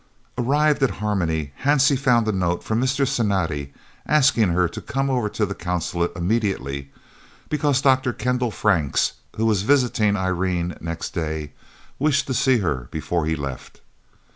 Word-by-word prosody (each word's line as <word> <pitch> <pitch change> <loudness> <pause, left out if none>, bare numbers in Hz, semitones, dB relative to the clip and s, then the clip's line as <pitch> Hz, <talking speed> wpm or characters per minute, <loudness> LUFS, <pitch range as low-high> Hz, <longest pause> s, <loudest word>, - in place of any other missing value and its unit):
Arrived 145 +4 +2
at 135 - +4
Harmony, 80 -9 -1
Hansie 140 0 +4
found 125 -4 +2
a - - +2
note 90 -3 -1
from 110 +2 0
Mr. 135 +1 +1
Cinatti 85 - -1 0.4
asking 130 -8 +4
her 90 +1 +2
to - - -8
come 135 0 -1
over 120 -5 0
to 105 - -1
the 100 - -4
Consulate 85 -1 -2
immediately, 85 - -2 0.6
because 145 -2 +1
Dr. 130 -2 +3
Kendal 125 0 -1
Franks, 90 -10 +1 0.2
who 110 - 0
was 105 -4 +2
visiting 120 -4 +2
Irene 90 -2 -1
next 85 0 -4
day, 80 -3 -3 0.5
wished 145 0 +2
to 130 - -2
see 130 0 +3
her 75 - -2
before 85 -3 -2
he 80 - +1
left. 70 -4 -7
105 Hz, 150 wpm, -22 LUFS, 85-130 Hz, 0.6 s, at